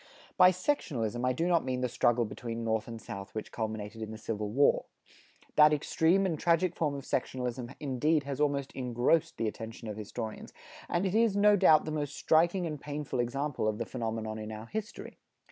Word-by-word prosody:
By 180 Hz, -1 st, +8 dB
sectionalism 140 Hz, -, -1 dB
I 130 Hz, -, +3 dB
do 165 Hz, +7 st, -1 dB
not 175 Hz, -2 st, +3 dB
mean 130 Hz, -1 st, -2 dB
the 125 Hz, -, +1 dB
struggle 120 Hz, 0 st, +2 dB
between 115 Hz, +1 st, -5 dB
North 110 Hz, -1 st, -1 dB
and 115 Hz, -1 st, -7 dB
South 100 Hz, -1 st, -8 dB
which 110 Hz, -, -5 dB
culminated 110 Hz, -1 st, -4 dB
in 110 Hz, -, -4 dB
the 110 Hz, -, -7 dB
Civil 105 Hz, -1 st, -3 dB
War. 140 Hz, +7 st, +3 dB, 0.7 s
That 150 Hz, 0 st, +8 dB
extreme 165 Hz, +5 st, +2 dB
and 165 Hz, -5 st, -1 dB
tragic 170 Hz, +1 st, +2 dB
form 150 Hz, -3 st, 0 dB
of 140 Hz, -, -6 dB
sectionalism 125 Hz, 0 st, -3 dB
indeed 145 Hz, +2 st, +1 dB
has 140 Hz, 0 st, -4 dB
almost 140 Hz, -2 st, 0 dB
engrossed 125 Hz, +5 st, +1 dB
the 115 Hz, -, 0 dB
attention 110 Hz, +1 st, -6 dB
of 105 Hz, -1 st, -5 dB
historians, 110 Hz, +1 st, -6 dB, 0.4 s
and 175 Hz, +3 st, 0 dB
it 190 Hz, -, -1 dB
is, 225 Hz, -2 st, +3 dB
no 205 Hz, 0 st, +6 dB
doubt, 160 Hz, -6 st, +5 dB
the 155 Hz, -, -3 dB
most 145 Hz, -2 st, -3 dB
striking 175 Hz, +3 st, +3 dB
and 150 Hz, -3 st, -5 dB
painful 145 Hz, -3 st, -4 dB
example 135 Hz, +1 st, -1 dB
of 110 Hz, -1 st, 0 dB
the 115 Hz, -, -3 dB
phenomenon 110 Hz, -3 st, -4 dB
in 110 Hz, 0 st, -6 dB
our 110 Hz, 0 st, -7 dB
history. 220 Hz, -, -6 dB
130 Hz, 195 wpm, -30 LUFS, 115-160 Hz, 0.7 s, By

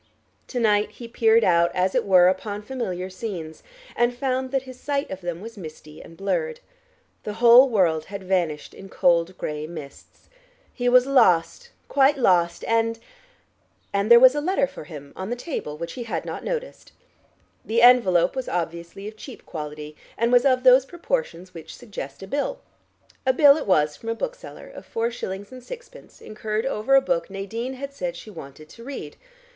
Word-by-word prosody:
To 250 Hz, -, -3 dB
night 210 Hz, -2 st, +2 dB
he 235 Hz, -, -10 dB
peered 230 Hz, -1 st, +3 dB
out, 170 Hz, -2 st, +4 dB
as 185 Hz, +1 st, +1 dB
it -, -, 0 dB
were 180 Hz, -2 st, +6 dB
upon 205 Hz, +3 st, -2 dB
familiar 190 Hz, -8 st, -4 dB
scenes, 185 Hz, -5 st, -7 dB, 0.3 s
and 240 Hz, 0 st, +1 dB
found 260 Hz, 0 st, -1 dB
that 270 Hz, 0 st, -1 dB
his 255 Hz, -1 st, -12 dB
sight 285 Hz, 0 st, -2 dB
of 190 Hz, 0 st, -6 dB
them 175 Hz, 0 st, -5 dB
was 225 Hz, 0 st, -10 dB
misty 155 Hz, -2 st, -11 dB
and 165 Hz, -, -14 dB
blurred. 470 Hz, -, -2 dB, 0.6 s
The 210 Hz, -, -5 dB
whole 240 Hz, +3 st, +7 dB
world 170 Hz, -8 st, +1 dB
had 200 Hz, 0 st, -8 dB
vanished 175 Hz, -5 st, -1 dB
in 195 Hz, -, -12 dB
cold 175 Hz, 0 st, +2 dB
gray 150 Hz, 0 st, -4 dB
mists. 155 Hz, -4 st, -12 dB, 0.5 s
He 245 Hz, -1 st, 0 dB
was 250 Hz, 0 st, +6 dB
lost, 255 Hz, -, +2 dB, 0.2 s
quite 280 Hz, +1 st, +3 dB
lost, 175 Hz, -8 st, +2 dB
and... 230 Hz, 0 st, +1 dB, 1.0 s
and 200 Hz, +2 st, 0 dB
there 235 Hz, 0 st, +9 dB
was 255 Hz, +1 st, +8 dB
a 295 Hz, -, -2 dB
letter 350 Hz, -2 st, +1 dB
for 210 Hz, -, -10 dB
him 145 Hz, -3 st, -11 dB
on 190 Hz, +2 st, -6 dB
the 240 Hz, -, -2 dB
table 245 Hz, -, -5 dB
which 170 Hz, +1 st, -6 dB
he 240 Hz, -, -6 dB
had 230 Hz, -, -4 dB
not -, -, -6 dB
noticed. -, -, -5 dB, 0.7 s
The 230 Hz, +2 st, +1 dB
envelope 235 Hz, -9 st, +5 dB
was 260 Hz, -1 st, -4 dB
obviously 170 Hz, +3 st, -4 dB
of 215 Hz, -, -8 dB
cheap 240 Hz, +3 st, -11 dB
quality, 150 Hz, -1 st, -7 dB, 0.2 s
and 235 Hz, +1 st, +1 dB
was 245 Hz, +1 st, +5 dB
of 255 Hz, -2 st, +3 dB
those 255 Hz, 0 st, +7 dB
proportions 345 Hz, -, -4 dB
which 160 Hz, -1 st, -10 dB
suggest 195 Hz, -, -8 dB
a -, -, -8 dB
bill. 290 Hz, -, -2 dB, 0.6 s
A 260 Hz, -, +2 dB
bill 280 Hz, +1 st, +7 dB
it 305 Hz, -, -5 dB
was 150 Hz, -5 st, +2 dB
from 225 Hz, -, -8 dB
a 230 Hz, -, -1 dB
bookseller, -, -, -7 dB
of -, -, -11 dB
four 230 Hz, +1 st, -2 dB
shillings 200 Hz, -3 st, -6 dB
and 255 Hz, -1 st, -11 dB
sixpence, -, -, -12 dB
incurred 215 Hz, +1 st, -4 dB
over 270 Hz, 0 st, +1 dB
a 270 Hz, -, +7 dB
book 170 Hz, -10 st, -1 dB
Nadine 225 Hz, +7 st, -5 dB
had 275 Hz, +2 st, -7 dB
said 270 Hz, -2 st, -4 dB
she 215 Hz, -, -10 dB
wanted 155 Hz, -3 st, -11 dB
to 230 Hz, -, -13 dB
read. 275 Hz, +2 st, -7 dB
220 Hz, 185 wpm, -24 LUFS, 175-260 Hz, 1.0 s, there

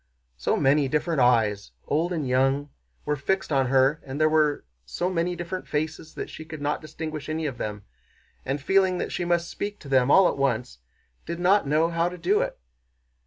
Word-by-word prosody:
So -, -, 0 dB
many 140 Hz, +1 st, +3 dB
different 150 Hz, +3 st, 0 dB
eyes, 110 Hz, -, +2 dB
old 165 Hz, +4 st, 0 dB
and 155 Hz, -6 st, -2 dB
young, 135 Hz, +3 st, +1 dB, 0.3 s
were 150 Hz, -, 0 dB
fixed 190 Hz, +6 st, -1 dB
on 135 Hz, -2 st, +2 dB
her, 135 Hz, +4 st, +3 dB
and 135 Hz, +2 st, -6 dB
there 155 Hz, -, +5 dB
were 150 Hz, -, +2 dB, 0.2 s
so 175 Hz, -, -2 dB
many 175 Hz, 0 st, 0 dB
different 175 Hz, +2 st, -5 dB
faces, 155 Hz, +1 st, -3 dB
that -, -, -4 dB
she -, -, -9 dB
could 155 Hz, -1 st, -9 dB
not 145 Hz, +1 st, -1 dB
distinguish 155 Hz, -1 st, -6 dB
any 160 Hz, 0 st, -2 dB
of 135 Hz, -5 st, -4 dB
them 105 Hz, -1 st, -4 dB, 0.6 s
and, 135 Hz, +2 st, -2 dB
feeling 190 Hz, +5 st, +2 dB
that -, -, -3 dB
she 175 Hz, -, -2 dB
must 170 Hz, 0 st, +1 dB
speak 205 Hz, 0 st, -4 dB
to 145 Hz, -, -11 dB
them 130 Hz, -1 st, +3 dB
all 190 Hz, +4 st, +7 dB
at -, -, -2 dB
once, 125 Hz, -, -1 dB, 0.5 s
did 170 Hz, +1 st, -4 dB
not 185 Hz, -1 st, +3 dB
know 155 Hz, +4 st, +2 dB
how 170 Hz, +1 st, +1 dB
to 180 Hz, -, -9 dB
do 180 Hz, +5 st, +2 dB
it. -, -, -3 dB
155 Hz, 200 wpm, -25 LUFS, 135-170 Hz, 0.6 s, all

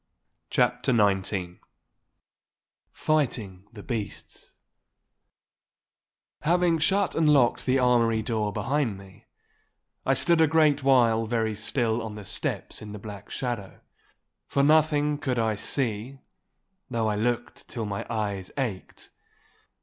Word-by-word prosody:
*CHAPTER -, -, +1 dB
XIX* 95 Hz, -4 st, +1 dB, 1.3 s
*FIGHTING 115 Hz, -11 st, -1 dB
THE 105 Hz, -4 st, -11 dB
BEASTS* 110 Hz, -5 st, -6 dB, 1.9 s
Having 170 Hz, +1 st, +2 dB
shut 195 Hz, +4 st, +2 dB
and 160 Hz, -2 st, +2 dB
locked 135 Hz, -5 st, +3 dB
the 130 Hz, +1 st, +3 dB
armoury 120 Hz, -3 st, +3 dB
door 110 Hz, -2 st, -1 dB
behind 130 Hz, -3 st, -1 dB
me, 95 Hz, -1 st, -16 dB, 0.8 s
I -, -, +2 dB
stood 170 Hz, -2 st, +4 dB
a 160 Hz, -, +6 dB
great 150 Hz, -2 st, +3 dB
while 120 Hz, -4 st, +3 dB
very 110 Hz, -1 st, 0 dB
still 110 Hz, +2 st, 0 dB
on 110 Hz, -2 st, -6 dB
the 105 Hz, -1 st, -9 dB
steps -, -, -3 dB
in 105 Hz, -1 st, -8 dB
the -, -, -6 dB
black 100 Hz, -1 st, -9 dB
shadow; 120 Hz, -7 st, -4 dB, 0.7 s
for 140 Hz, -, +1 dB
nothing 150 Hz, -1 st, +3 dB
could 130 Hz, -5 st, -1 dB
I 110 Hz, -1 st, +1 dB
see, 115 Hz, +3 st, -3 dB, 0.7 s
though 115 Hz, -3 st, 0 dB
I 105 Hz, -, 0 dB
looked 120 Hz, +3 st, -2 dB
till 115 Hz, -2 st, -3 dB
my 100 Hz, -1 st, -3 dB
eyes 100 Hz, -4 st, -2 dB
ached. 115 Hz, -9 st, -5 dB
115 Hz, 120 wpm, -26 LUFS, 105-140 Hz, 1.9 s, a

